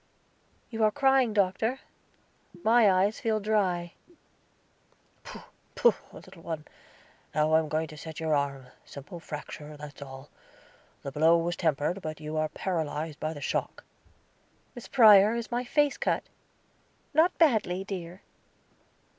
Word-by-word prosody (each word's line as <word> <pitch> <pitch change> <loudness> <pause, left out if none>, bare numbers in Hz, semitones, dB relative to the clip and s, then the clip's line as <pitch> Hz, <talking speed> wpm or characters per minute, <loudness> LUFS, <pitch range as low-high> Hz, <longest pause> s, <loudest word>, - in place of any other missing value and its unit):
"You 225 -1 -1
are 215 - +5
crying, 265 +1 +3
Doctor; 210 +5 0 0.8
my 225 -2 +5
eyes 190 +3 +1
feel 220 -1 0
dry." 190 -5 0 1.3
"Pooh, - - -10 0.3
pooh, 480 - +5 0.2
little 165 - -14
one. 160 -2 -5 0.7
Now 155 +1 +2
I 160 - +6
am 155 -1 -3
going 155 +2 0
to 155 - -11
set 160 +1 -8
your 160 -1 0
arm; 140 -3 -2
simple 145 +5 -10
fracture, 150 -1 -8
that's 145 -1 -11
all. 135 0 -10 0.7
The 140 - -5
blow 160 +4 +4
was 170 +1 -1
tempered, 160 +2 -1
but 155 -2 -6
you 155 0 -6
are 155 0 0
paralyzed 155 -3 -3
by 155 +1 -3
the 145 - -9
shock." - - -3 0.9
"Miss 245 - -10
Prior, 215 -4 +7
is 235 0 -5
my 240 +1 -1
face 290 +2 +1
cut?" - - 0 0.9
"Not 325 +4 +3
badly, 220 - +2
my - - -5
dear." 185 -2 -7
175 Hz, 140 wpm, -28 LUFS, 155-220 Hz, 1.3 s, Prior